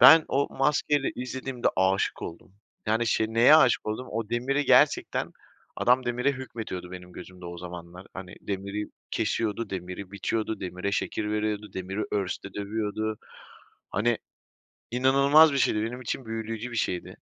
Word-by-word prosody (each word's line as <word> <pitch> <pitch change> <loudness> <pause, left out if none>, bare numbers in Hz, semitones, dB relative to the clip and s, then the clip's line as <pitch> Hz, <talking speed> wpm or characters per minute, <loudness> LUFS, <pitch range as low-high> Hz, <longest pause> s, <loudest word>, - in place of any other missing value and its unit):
Ben 160 -1 +10
o 140 +1 +1
maskeyle 145 0 +2
izlediğimde, 125 0 -2
aşık 95 +1 +1
oldum. 85 +2 -8 0.3
Yani, 110 +2 +2
şey, 110 0 +2
neye 120 +7 +7
aşık 130 -8 +4
oldum? 110 +4 -3
O 110 -1 -3
demiri 135 +5 0
gerçekten, - - +3 0.5
adam 125 +1 +3
demire 125 +3 +1
hükmetiyordu 110 -9 -6
benim 90 -1 -9
gözümde 90 -1 -11
o 85 0 -7
zamanlar. 90 +1 -9
Hani, 95 -1 -8
demiri 100 +1 -3 0.2
kesiyordu, 115 0 -1
demiri 90 +1 -5
biçiyordu, 110 +2 -2
demire 90 +1 -3
şekil 105 0 -1
veriyordu, 105 0 -2
demiri 95 +2 -4
örste 100 -1 -2
dövüyordu. 105 +1 -2 0.7
Hani, 115 +3 +1 0.7
inanılmaz 140 +5 +6
bir 140 - +1
şeydi. 105 -4 +2
Benim 120 +3 -4
için 130 +2 -3
büyüleyici 115 +1 -4
bir 120 - -5
şeydi. 90 -5 -2
110 Hz, 140 wpm, -27 LUFS, 95-125 Hz, 0.7 s, Ben